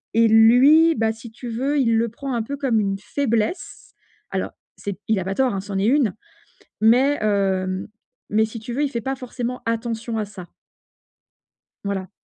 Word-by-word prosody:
et 230 0 +5
lui, 260 +9 +6
bah, 220 -1 +1
si 230 +1 -11
tu 245 +2 -9
veux, 270 +6 -1
il 230 -4 +3
le 230 0 +1
prend 265 +3 -6
un 235 - 0
peu 280 +5 -5
comme 260 -6 +1
une 195 -2 -1
faiblesse. 230 - -2 0.4
Alors - - -2 0.3
c'est 200 -2 -5
il 220 -3 +2
a - - -2
pas 195 +1 -2
tort, 245 -7 +1
ça 205 0 -7
en 195 - -1
est 195 - +1
une, 255 -7 +2 0.7
mais 255 +6 +4
heu, 190 -2 0 0.4
mais 220 +1 +3
si 225 +1 -8
tu 235 +2 -7
veux, 285 +4 0
il 285 - 0
fait 235 - -2
pas 270 +4 -2
forcément 250 -1 -5
attention 230 0 -2
à 215 - -1
ça. 195 -3 -11 1.4
Voilà. 190 -2 -3
230 Hz, 185 wpm, -22 LUFS, 210-255 Hz, 1.4 s, lui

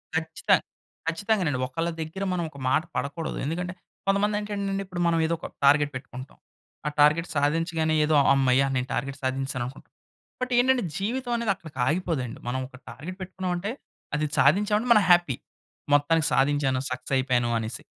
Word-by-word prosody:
ఖచ్చితం - - +2 0.5
ఖచ్చితంగానండి. 175 - 0
ఒకళ్ళ 165 +6 -2
దగ్గర 160 +5 -5
మనం 175 -1 -1
ఒక 140 - -14
మాట 155 - +3
పడకూడదు. 155 +3 -3
ఎందుకంటే 180 +4 -3 0.3
కొంతమంది 200 +2 +2
ఏంటంటే 200 -2 -2
ఇప్పుడు 180 -2 -4
మనం 165 -1 +2
ఏదో 165 - 0
ఒక - - -6 0.2
టార్గెట్ 145 +1 +5
పెట్టుకుంటాం. 130 0 -8 0.5
ఆ - - +2
టార్గెట్ 150 +3 +5
సాధించగానే 160 +2 +1
ఏదో 150 0 +2
"హమ్మయ్య! 135 -1 +4
నేను 125 0 -1
టార్గెట్ 140 0 -3
సాధించేసాను" 130 -1 -1
అనుకుంటాం. 130 +3 -10 0.5
బట్ 255 0 -2
ఏంటంటే 255 0 +4
జీవితం 245 +5 -2
అనేది 235 -3 +1
అక్కడికి 160 -7 -13
ఆగిపోదండి. 155 -7 -1
మనం 125 +2 -1
ఒక 130 - -16
టార్గెట్ 185 +7 -8
పెట్టుకున్నామంటే 185 +1 -3 0.4
అది 150 +1 0
సాధించాం 205 +9 +4
అంటే 240 - -4
మనం 210 -3 +5
హ్యాపీ. 175 -7 +5 0.6
"మొత్తానికి 150 +2 +3
సాధించాను. 135 0 +2
సక్సెస్ 125 +2 -4
అయిపోయాను" 125 -2 +1
అనేసి. 110 0 -5
160 Hz, 155 wpm, -26 LUFS, 135-185 Hz, 0.6 s, టార్గెట్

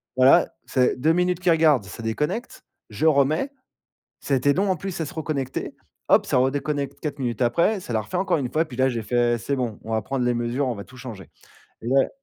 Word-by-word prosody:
voilà, 130 +1 +6 0.2
c'est 125 -1 +2
2 160 +5 +3
minutes 180 0 +1
qu'ils 180 -1 +2
regardent, 155 -9 +4
ça 95 - -9
déconnecte, 150 - -3 0.3
je 105 +9 -2
remets, 155 - +3 0.7
ça 140 - -3
a - - +3
été 140 +3 +3
long, 195 +5 +1
en 185 - +2
plus, 185 +1 -5
à 160 - -1
se - - -8
reconnecter. 145 -5 -3 0.3
Hop! - - +5
ça - - +2
redéconnecte 140 +1 -1
4 150 - -4
minutes 120 -2 -2
après. 170 - +2
Ça 150 - -8
l'a 110 - +1
refait 105 - -4
encore 190 - +1
1 130 -4 -3
fois. 155 +4 +1
Et - - +1
puis 125 -5 -10
là, 130 0 +3
j'ai 115 -2 -2
fait, 120 +2 +1
c'est 140 +5 -2
bon, 120 -5 -3
on 115 - -7
va 110 - +1
prendre 135 +3 -2
les 125 - +2
mesures, 120 +4 -1
on 120 - -2
va 100 - -7
tout 130 - -16
changer. 115 -6 -9 0.5
Et 115 - -9
là 135 +1 +3
135 Hz, 240 wpm, -24 LUFS, 120-155 Hz, 0.7 s, voilà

